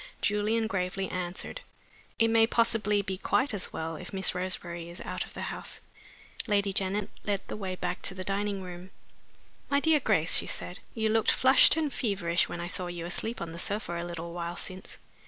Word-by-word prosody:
Julian 215 +2 +2
gravely 190 -2 -1
answered: 180 - -4 0.6
"It 225 0 +4
may 225 0 +5
possibly 220 -3 +2
be 190 -1 -3
quite 265 +4 +2
as 200 - -2
well 160 0 -3
if - - -9
Miss 190 -1 +2
Roseberry 175 -2 -3
is 175 - -9
out - - -3
of - - -14
the - - -3
house." - - -2 0.7
Lady 200 -2 +2
Janet 195 0 0
led 200 -2 0
the - - -4
way 190 -3 -3
back 180 - -3
to 190 - +1
the 185 - -4
dining 200 0 -1
room. 180 0 -8 0.8
"My 280 - +4
dear 315 +1 +4
Grace," 190 - +3
she - - +2
said, 180 - -3 0.2
"you 220 -1 +1
looked 220 0 +3
flushed 260 +4 +7
and 305 -3 0
feverish 190 -7 +1
when 175 - -4
I 170 - -3
saw 180 +1 -3
you 175 -1 -5
asleep 220 +7 -2
on 170 -1 -4
the 165 - -7
sofa 180 -4 -2
a - - -4
little 170 -1 -5
while 170 0 -4
since. 185 0 -5
190 Hz, 195 wpm, -29 LUFS, 175-220 Hz, 0.8 s, flushed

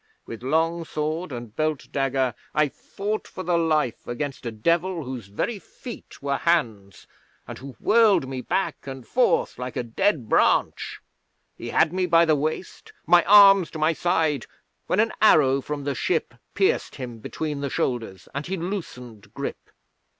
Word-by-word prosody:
With 115 - -8
long 165 +5 +1
sword 155 +2 -3
and 120 -3 -7
belt 155 -1 -1
dagger 135 -2 0 0.2
I 150 -1 +3
fought 205 +9 -5
for 185 - -7
the 175 -1 +1
life 155 -7 0
against 130 +1 -4
a - - -3
Devil 170 - 0
whose 125 -5 -7
very 200 - -3
feet 235 - -11
were 140 -1 0
hands, 110 - -1 0.4
and - - -8
who 135 0 -9
whirled 215 - +4
me 130 -1 -4
back 190 0 -2
and 135 -2 -7
forth 245 - +1
like 125 0 -5
a - - -1
dead 130 - 0
branch. - - +1 0.5
He - - -7
had 160 +1 +3
me 185 -1 0
by 170 -1 +5
the 155 -2 +3
waist, 155 +5 -4
my 175 +1 +6
arms 195 -3 +8
to - - -8
my 155 +2 +2
side, 160 -6 0 0.4
when 185 - +1
an 220 +1 +2
arrow 140 -10 +5
from 145 +1 -5
the 140 0 -1
ship - - -1 0.2
pierced - - +1
him 120 -3 -7
between 150 +5 -4
the 140 - -2
shoulders, 115 -9 -3
and 140 +3 -4
he 190 +1 -2
loosened 125 - -6
grip. - - -6
150 Hz, 165 wpm, -24 LUFS, 130-175 Hz, 0.5 s, arms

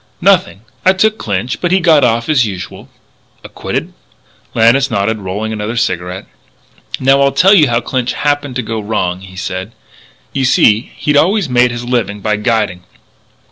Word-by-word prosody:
"Nothing. 185 - +2 0.2
I 190 - +5
took 215 +3 +1
Clinch.... 105 +4 -3
But 175 - 0
he 190 - +4
got 160 -5 +4
off 115 -1 +1
as 150 -5 +3
usual." 95 -5 -7 0.5
"Acquitted?" - - -5 0.6
Lannis 120 +5 +3
nodded, 105 +2 -1
rolling 105 +3 -4
another 110 +2 -4
cigarette: 90 -5 -2 0.7
"Now, 135 +1 +3
I'll 140 0 +3
tell 195 +7 +4
you 160 -8 +5
how 120 0 +1
Clinch 125 -1 -2
happened 145 -2 -1
to 125 - -2
go 110 0 -4
wrong," 100 -4 -2
he 95 -1 -13
said. 95 +2 -5 0.6
"You 135 - -1
see 115 -3 +3
he'd 150 -1 0
always 190 +1 +2
made 125 0 +3
his 120 0 -6
living 115 -5 -2
by 105 +1 -1
guiding. 105 -5 -1
120 Hz, 165 wpm, -14 LUFS, 105-145 Hz, 0.7 s, I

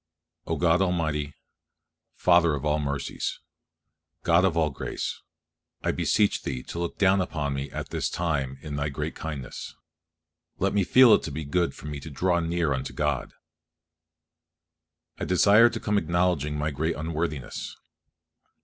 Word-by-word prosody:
O - - 0
God 85 +1 +3
Almighty, 80 -6 -1 0.8
Father 85 -3 +4
of 70 - -5
all 75 0 +2
mercies, 70 -1 -3 0.8
God 85 +2 +4
of 85 -3 +1
all 80 -2 +2
grace, 70 - -4 0.6
I - - +2
beseech 105 -2 +1
Thee 65 -2 -4
to 85 - -6
look 85 -1 -3
down 95 -1 +4
upon 75 -6 -2
me 70 +1 -4
at - - -6
this - - -1
time 70 -6 -2
in 75 -2 -5
Thy 70 +1 -1
great 70 - -4
kindness; 75 -6 -6 0.8
let 95 +1 0
me 100 -1 +3
feel 125 +4 +7
it - - +5
to 80 - -5
be 75 +2 -5
good 85 +4 0
for - - -12
me 75 -1 -5
to 80 - -9
draw 85 +5 +1
near 85 -3 0
unto 65 0 -4
God. 75 -4 -1 1.9
I - - -2
desire 100 +6 +6
to 120 - -5
come 105 -1 +1
acknowledging 85 -5 0
my 75 +1 -1
great 80 +4 -1
unworthiness. 80 -4 -4
80 Hz, 155 wpm, -26 LUFS, 75-90 Hz, 1.9 s, feel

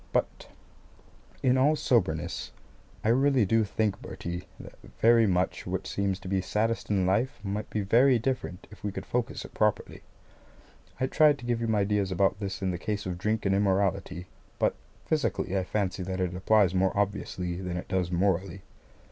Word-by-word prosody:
But - - -1 1.0
in 130 0 +4
all 145 +4 +4
soberness, 85 - 0 0.5
I 110 - +2
really 135 -1 +4
do 115 +3 +3
think, 105 0 -1
Bertie, 85 +1 -6
that - - -10 0.3
very 115 -1 +5
much 90 -1 0
which - - -3
seems 100 -1 -1
to - - -8
be 95 0 +1
saddest 110 +5 -1
in 95 -3 +2
life 105 +8 +1
might 105 +1 -3
be 105 - -1
very 120 +6 +4
different 115 -6 -3
if 105 - -14
we 105 - -2
could - - -6
focus 125 0 -2
it - - -12
properly. 105 -1 0 1.0
I 130 - +2
tried 150 +2 +4
to 120 - -11
give 120 -1 0
you 115 - -1
my 105 -2 +2
views 100 -1 0
about 95 +1 +2
this 100 -1 -4
in 95 - +1
the 90 - -4
case 105 0 -3
of 90 -1 -4
drink 105 +3 -1
and 95 - +3
immorality. 95 -2 0 0.3
But - - +2 0.3
physically, 145 - -1
I 95 - +1
fancy 95 0 -2
that 95 +1 -3
it 90 -1 -1
applies 95 0 +3
more 95 +1 +1
obviously 95 -3 -2
than 90 -1 -4
it 90 - -6
does 90 -2 0
morally. 95 +1 0
100 Hz, 180 wpm, -28 LUFS, 95-115 Hz, 1.0 s, very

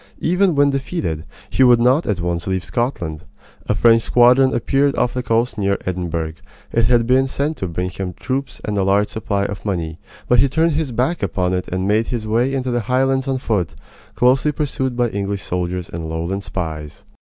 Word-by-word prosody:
Even 180 0 +2
when 140 0 +4
defeated, 135 - -3 0.3
he - - 0
would 125 -2 +7
not 130 +7 +3
at 105 -4 0
once 85 0 -2
leave 95 -1 -1
Scotland. 90 - -2 0.5
A - - +1
French 115 -1 +5
squadron 125 +3 +5
appeared 135 +4 +1
off 125 - +1
the 125 - -2
coast 115 -1 0
near 100 0 +1
Edinburgh. 85 -3 -2 0.4
It 115 -1 +2
had 120 0 +3
been 130 +2 +3
sent 145 +4 -2
to 95 - -3
bring 90 +2 -3
him 90 0 -5
troops 135 +8 -4
and 105 -1 -1
a - - +2
large 100 +2 +2
supply 100 -2 -2
of 105 - -5
money, 85 -5 -3 0.3
but 125 - +4
he 135 +3 +4
turned 165 +4 +2
his 150 -3 -1
back 125 +9 0
upon 90 -3 0
it 90 0 -2
and 95 +1 -2
made 110 +2 +2
his 120 -3 -3
way 115 +5 +1
into 130 -2 -1
the 120 - +1
Highlands 135 +1 +2
on 135 -1 0
foot, 105 - -1 0.4
closely 130 +4 +3
pursued 135 -4 -2
by 120 -1 +2
English 100 -1 -3
soldiers 90 0 -3
and 80 -1 -6
Lowland 85 +5 -3
spies. 80 -6 -5
115 Hz, 195 wpm, -20 LUFS, 90-130 Hz, 0.5 s, would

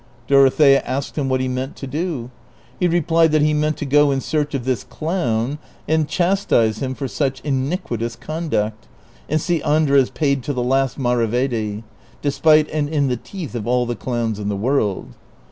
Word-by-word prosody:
Dorothea 135 +1 +5
asked 140 +1 -4
him 140 -3 -1
what 130 0 +1
he 130 - -1
meant 130 +1 -3
to - - -7
do. 145 -4 -3 0.5
He 180 - +3
replied 165 -1 +3
that 155 -1 +4
he 150 0 +3
meant 150 0 0
to - - -4
go 145 +1 +4
in 135 -1 +1
search 150 +1 -1
of 125 -3 -3
this 130 -3 -1
clown 150 -6 -2 0.3
and 155 -1 +1
chastise 175 - +1
him 130 -1 -2
for 135 - -4
such 135 0 -2
iniquitous 130 - -2
conduct, 120 -9 -3 0.4
and 155 - +2
see 170 0 -1
Andres 145 -3 +3
paid 140 -3 0
to 145 +3 -3
the 125 -2 -1
last 135 0 +1
maravedi, 120 -3 0 0.4
despite 155 +1 +3
and 150 -1 -1
in 145 -3 +1
the 125 - 0
teeth 170 - -8
of 115 -3 -4
all 125 0 +2
the 120 0 -3
clowns 115 -1 -2
in 105 -1 -3
the 100 - -2
Avorld. 110 -3 0
135 Hz, 180 wpm, -20 LUFS, 120-155 Hz, 0.5 s, Dorothea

